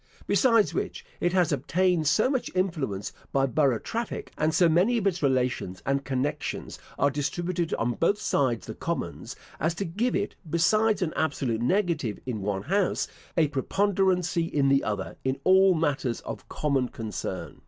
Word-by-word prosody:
Besides 230 -5 +3
which, - - -3
it 175 - +1
has 180 -4 +3
obtained 165 +4 +1
so 215 - +4
much 260 -2 -1
influence 150 - -1 0.2
by 135 -1 +2
borough 135 -2 +2
traffic, 230 - -4
and 155 +1 +1
so 170 +2 +4
many 180 +9 +3
of 215 - -1
its 190 -3 +1
relations 125 -9 0
and 140 0 0
connections 140 +3 -3 0.2
are 140 +1 +3
distributed 170 +4 -2
on 115 +2 0
both 200 - +1
sides 130 -5 0
the - - -6
commons, - - -4 0.2
as 160 +3 0
to 200 - -3
give 215 +9 -1
it, 200 - -1 0.2
besides 215 +6 +3
an 160 - -2
absolute 135 -7 -1
negative 160 - 0
in 120 -5 -3
one 100 -1 -2
house, 195 +4 +1 0.3
a 155 -3 +4
preponderancy 180 +3 +1
in 140 -4 +1
the 135 0 +3
other, 105 -3 -3
in 130 +1 -1
all 190 0 +6
matters 145 -7 -1
of - - -8
common 140 -4 0
concern. 105 -6 -5
155 Hz, 165 wpm, -27 LUFS, 130-185 Hz, 0.3 s, all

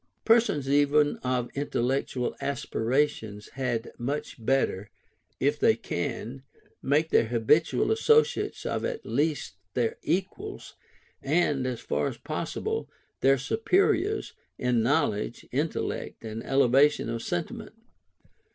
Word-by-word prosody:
Persons 225 - +3
even 145 +1 +3
of 125 -1 -2
intellectual 130 -2 -1
aspirations 120 -5 -1
had 125 -3 -3
much 125 -1 -4
better, 110 -6 +1 0.5
if - - +1
they - - +5
can, 130 +4 -4 0.4
make 150 +4 +2
their 110 - +4
habitual 120 +7 +2
associates 450 +1 +2
of - - -2
at 475 -1 -3
least 145 - -1 0.2
their 120 -2 0
equals, 180 +5 -3 0.5
and, 145 -3 +1
as 125 -3 -3
far 75 0 -1
as - - -5
possible, - - -3 0.3
their 135 +1 +4
superiors, 370 - +1 0.2
in 125 -2 +1
knowledge, 120 -4 0
intellect, - - -2
and 110 +1 -5
elevation 135 +2 +3
of 115 0 -3
sentiment. 195 - -4
135 Hz, 110 wpm, -27 LUFS, 120-155 Hz, 0.5 s, they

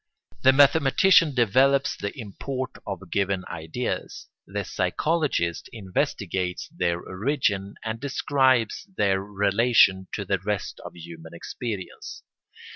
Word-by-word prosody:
The 130 - +7
mathematician 145 +3 +5
develops 135 +4 +3
the 100 - -4
import 130 +4 -5
of 95 -3 -6
given 100 -2 0
ideas; 80 +10 -5 0.2
the - - -4
psychologist 150 - -1
investigates 95 - -2
their 85 - 0
origin 100 -2 -1
and 110 0 -4
describes 130 - +1
their 95 -1 +2
relation 100 -1 +3
to 100 - -4
the 95 0 0
rest 105 +2 -3
of - - -9
human 85 -1 -11
experience. 105 +2 -6
105 Hz, 110 wpm, -25 LUFS, 95-130 Hz, 0.2 s, The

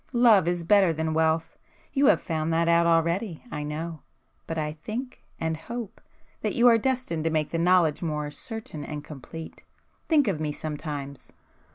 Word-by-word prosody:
Love 230 -7 +5
is 175 -1 0
better 195 0 +5
than 160 0 -1
wealth,—you 160 - 0
have - - +5
found 160 -1 -2
that 165 +1 +2
out 170 0 +4
already 170 +4 +1
I 150 - -3
know!—but 155 0 -7
I 150 -1 -1
think—and 220 -8 -5
hope—that 230 - -7
you 245 -1 +5
are 230 -1 +5
destined 250 -10 -1
to - - +3
make 155 -2 0
the 165 - -1
knowledge 170 -3 +3
more 150 -3 -2
certain 210 - -6
and 150 0 -6
complete! 160 +3 -9 0.5
Think 300 -6 +4
of 190 -7 0
me 150 -1 -2
sometimes! 145 -3 -6
165 Hz, 155 wpm, -26 LUFS, 155-200 Hz, 0.5 s, Love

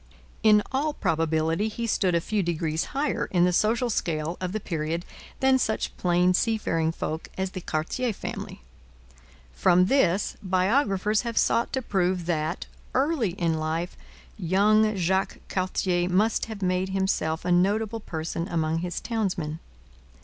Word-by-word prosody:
In 210 -1 +5
all 295 +3 0
probability 160 - 0
he 230 +2 -4
stood 190 -5 +1
a 170 - +2
few 210 +4 0
degrees 165 -2 -1
higher 285 +2 -1
in 175 -2 +3
the 180 - +2
social 230 +6 +2
scale 160 -4 -1
of 180 -1 -2
the 215 - -2
period 165 -2 -3 0.4
than 265 0 +4
such 220 -3 -1
plain 180 0 +3
seafaring 180 -7 +1
folk 160 -1 -4
as 190 0 -2
the 185 - -6
Cartier 175 +11 -1
family. 190 - -7 0.9
From 175 - +4
this, 205 -5 +2
biographers 200 +2 +2
have 235 -2 -5
sought 230 +1 +2
to 265 - -1
prove 185 -4 0
that, 160 0 -1 0.3
early 265 - +1
in 165 -3 0
life, 160 +3 -2 0.4
young 210 +4 +3
Jacques 190 +2 0
Cartier 185 -1 0
must 210 +5 +2
have 220 -3 -7
made 185 +1 0
himself 190 -4 -1
a 180 - +1
notable 210 +5 +2
person 165 -2 -4
among 160 -1 0
his 175 0 -3
townsmen. 180 -9 -2
185 Hz, 145 wpm, -26 LUFS, 170-215 Hz, 0.9 s, In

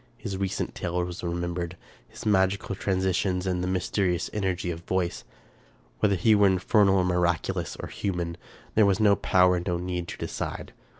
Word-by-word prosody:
His 100 - -5
recent 95 -1 -2
tale 90 0 -2
was 90 0 -7
remembered; 85 0 -3 0.3
his - - -11
magical 100 -1 +2
transitions 95 -1 0
and 90 -1 0
mysterious 90 -1 0
energy 95 -3 -1
of 80 - -5
voice. 90 0 -2 0.8
Whether 100 -2 +3
he 110 +5 +4
were 100 -1 +5
infernal 95 +1 +3
or 90 - +2
miraculous 90 -1 0
or - - -5
human, 90 -4 -3 0.4
there 105 -2 +5
was 100 +1 +2
no 105 -2 +5
power 90 -1 +3
and 85 - -5
no 90 -1 +1
need 90 -1 -3
to - - -7
decide. - - -5
90 Hz, 165 wpm, -27 LUFS, 90-95 Hz, 0.8 s, were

